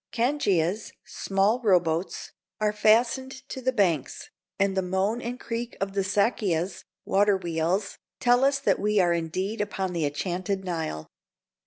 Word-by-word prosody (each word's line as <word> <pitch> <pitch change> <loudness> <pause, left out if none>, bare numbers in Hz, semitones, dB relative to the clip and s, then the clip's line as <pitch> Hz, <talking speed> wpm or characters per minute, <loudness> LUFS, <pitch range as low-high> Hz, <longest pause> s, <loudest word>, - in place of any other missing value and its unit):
Cangias 215 - 0
(small 195 +5 +1
row 195 -6 +5
boats) 165 +1 -3 0.3
are 210 -1 +1
fastened 245 +5 +2
to 260 - -6
the 260 +1 +1
banks, 175 - 0 0.3
and 195 0 +1
the 190 - +2
moan 190 +6 -1
and 245 +2 -5
creak 235 +1 -5
of 195 0 -2
the 200 - +1
sakias 190 -3 0 0.2
(water 205 0 +3
wheels) 175 +3 -1 0.2
tell 245 +1 +4
us 275 0 +2 0.2
we 210 +1 +2
are 175 -2 +4
indeed 185 +6 -2
upon 190 -3 -2
the 165 -3 0
enchanted 185 +6 -3
Nile. 160 - -3
195 Hz, 145 wpm, -26 LUFS, 180-230 Hz, 0.3 s, row